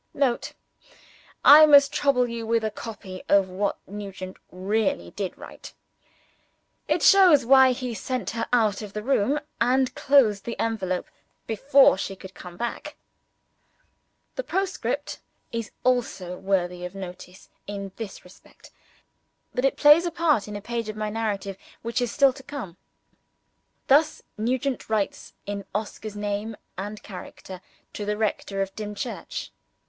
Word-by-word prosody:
[Note. 265 -4 0 0.9
I 310 +2 +10
must 280 -1 +7
trouble 255 -4 +2
you 230 -1 -5
with 230 0 +1
a 215 - -1
copy 200 -4 -8
of 195 -2 +4
what 195 +2 -1
Nugent 195 -2 -7
really 190 - -1
did 195 -3 -5
write. - - -11 1.1
It - - +1
shows 360 - +7
why 265 +1 +7
he 250 -1 -4
sent 240 -3 -3
her 230 0 -3
out 220 -4 +2
of 205 -2 -8
the 210 - -4
room, 275 +3 +2 0.2
and 260 +1 +2
closed 235 -8 +3
the 235 - -5
envelope 190 -5 -1 0.4
before 265 -1 +4
she 195 - -4
could 190 0 -12
come 175 -1 -11
back. 240 +3 -4 1.4
The - - -1
postscript 385 -2 -2 0.3
is 230 -2 -4
also 230 -8 0
worthy 180 -2 -1
of 180 +2 -6
notice, 180 -1 -9 0.2
in 200 -1 -5
this 225 -4 -7
respect 180 - -18 0.8
that 250 - 0
it 270 - +1
plays 300 +4 +7
a - - -2
part 325 -10 +1
in 210 - -6
a 205 - -5
page 230 0 -4
of 215 - -5
my 215 0 -2
narrative 205 -3 -3 0.3
which 235 +2 -1
is 245 - -1
still 275 -2 +4
to 265 - -12
come. 260 - -7 1.1
Thus 300 +3 +3
Nugent 255 +4 -2
writes, 215 -3 -2
in 200 0 -4
Oscar's 215 0 -4
name 205 +1 -3 0.2
and 205 +3 -6
character, 185 -1 -10 0.3
to 210 - -5
the 210 0 -2
rector 200 -2 -1
of 195 0 -8
Dimchurch. 210 -1 -5
215 Hz, 145 wpm, -25 LUFS, 195-255 Hz, 1.4 s, I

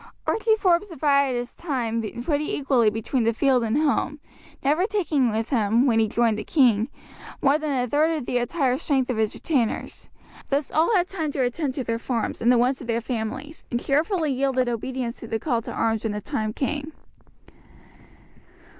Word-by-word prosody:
Archie 440 0 +2
Forbes 385 -1 +2
divided 280 -5 +2
his 245 0 -5
time 240 -8 -2 0.2
pretty 295 +2 -1
equally 265 -6 +3
between 225 +4 -1
the 230 +1 +2
field 260 -1 +3
and 225 +3 0
home, 295 -1 0 0.4
never 305 +8 +2
taking 315 - +1
with 220 +3 -2
him, 230 0 +3
when 230 -4 +3
he 220 - +3
joined 225 0 +1
the - - -4
king, 235 -7 +3 0.5
more 280 +2 +3
than 285 -5 -1
a - - -2
third 310 +5 +2
of 280 - -5
the 245 - 0
entire 260 0 0
strength 265 -3 0
of 240 - -3
his 220 -1 0
retainers; 260 -9 -2 0.4
thus 280 +1 0
all 320 +7 +3
had 360 -2 +2
time 320 -6 -3
to 265 - 0
attend 260 +2 -2
to 265 - -2
their 230 -1 -2
farms 235 -2 -2
and 235 +2 +4
the 250 - +5
wants 255 +3 +1
of 245 - -8
their 230 -1 0
families, 240 +6 -5
and 240 - -1
cheerfully 310 +1 +1
yielded 260 -1 +1
obedience 240 +1 -3
to 230 - -8
the 225 - -1
call 235 -1 -1
to - - -7
arms 225 -1 0
when 220 -2 -2
the 210 - -3
time 215 -2 -3
came. 290 +5 -3
260 Hz, 190 wpm, -24 LUFS, 230-295 Hz, 0.5 s, the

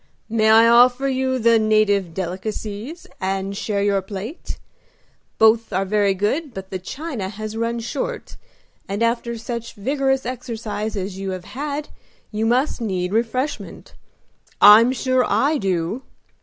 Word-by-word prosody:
"May 220 -1 +2
I 225 +1 +7
offer 245 +3 +5
you 260 -1 0
the 230 -1 +4
native 215 -4 +2
delicacies, 205 - -5
and 195 +1 -2
share 200 0 -1
your 200 -1 +2
plate? 205 - -7 0.8
Both 220 +1 +4
are 190 +1 0
very 200 0 +2
good, 255 - -1
but 190 0 -8
the 185 - -3
china 255 - -5
has 215 +1 -6
run 230 +1 -1
short, - - -4 0.5
and 200 +3 -1
after 235 0 -1
such 235 0 -6
vigorous 270 +4 0
exercise 225 -4 -4
as 190 0 -4
you 195 0 -3
have 180 - -15
had 290 +6 -5 0.4
you 220 +1 -1
must 255 +3 +1
need 185 -4 -2
refreshment. 245 +5 -2 0.7
I'm 215 +4 +8
sure 255 0 +1
I 290 +4 +1
do!" 185 +3 -1
220 Hz, 140 wpm, -21 LUFS, 200-250 Hz, 0.8 s, I'm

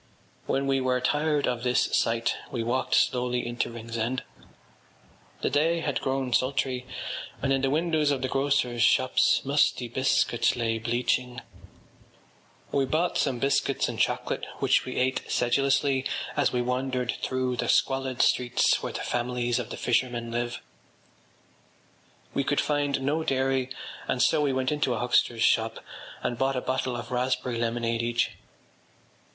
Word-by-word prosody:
” - - -34
When 135 +1 0
we 135 -1 +1
were 130 0 +1
tired 145 +3 +1
of 125 -2 -1
this 125 0 +1
sight 115 0 +1 0.2
we 120 -3 -2
wandered 120 +3 0
slowly 125 0 +1
into 120 0 -2
Ringsend. 115 +2 -3 1.2
The - - 0
day 165 +4 +2
had 145 -4 -1
grown 135 -2 -1
sultry, 130 0 0 0.5
and 135 0 +1
in 135 - +1
the 135 - +1
windows 155 0 +1
of 135 -2 0
the - - +1
grocers’ 135 -3 0
shops 130 +3 +4
musty 140 -3 +2
biscuits 120 -1 +1
lay 115 -2 -1
bleaching. 125 +2 -1 1.3
We 140 -1 +2
bought 160 +6 0
some 125 - +1
biscuits 135 +3 +1
and - - -5
chocolate - - -1
which - - +2
we - - -5
ate 130 +1 0
sedulously 135 +2 +2 0.3
as - - +2
we 125 -1 0
wandered 125 0 -1
through 130 -1 -1
the - - -1
squalid 135 -1 +2
streets 120 -1 +2
where - - -4
the - - -4
families 120 0 -1
of 120 - -5
the - - -6
fishermen 120 -1 0
live. 120 0 -3 1.7
We 140 - 0
could 145 +1 0
find 145 -2 0
no 150 +4 0
dairy 130 -2 0 0.4
and 125 - -1
so 155 +4 +3
we 145 -2 +2
went 130 +1 0
into 145 -4 0
a - - -3
huckster’s 120 -1 +2
shop 115 0 +2 0.5
and 120 -1 -2
bought 135 0 +1
a 125 - -1
bottle 130 -1 -1
of 120 +1 -7
raspberry 125 -1 -1
lemonade 115 0 -1
each. 120 0 0
130 Hz, 155 wpm, -27 LUFS, 120-135 Hz, 1.7 s, shops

